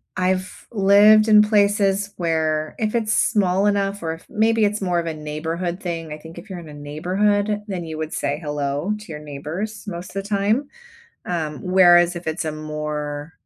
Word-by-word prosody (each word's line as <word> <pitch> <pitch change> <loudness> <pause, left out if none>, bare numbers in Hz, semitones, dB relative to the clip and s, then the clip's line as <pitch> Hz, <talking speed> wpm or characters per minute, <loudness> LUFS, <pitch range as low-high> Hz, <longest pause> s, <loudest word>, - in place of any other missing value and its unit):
I've 185 +1 -2
lived 210 +1 +6
in 210 -1 +7
places 205 -1 +2
where 155 -2 -1
if 215 +1 -1
it's 220 -2 +1
small 195 -2 +2
enough 200 -1 0
or 160 -1 -2
if 165 - -12
maybe 225 +1 +2
it's 210 0 +1
more 175 -2 +1
of 170 - -3
a 165 - -2
neighborhood 160 +4 -4
thing, 165 -3 -4
I 150 - -6
think 160 +2 -13
if 195 +4 -11
you're 185 - -6
in 165 -3 -11
a - - -10
neighborhood, 200 +8 0
then 185 -3 -4
you 160 -1 -6
would 155 0 -4
say 145 +1 -2
"hello" 145 +4 -2
to 210 - -12
your 150 - -6
neighbors 155 +9 -6
most 180 -1 -7
of 195 - -2
the 200 - -11
time, 215 +7 +1 0.6
um, 160 -4 -3
whereas 175 -1 +5
if 175 -1 -5
it's 160 +1 -2
a 155 - -2
more, 150 0 -5
180 Hz, 190 wpm, -22 LUFS, 155-205 Hz, 0.6 s, in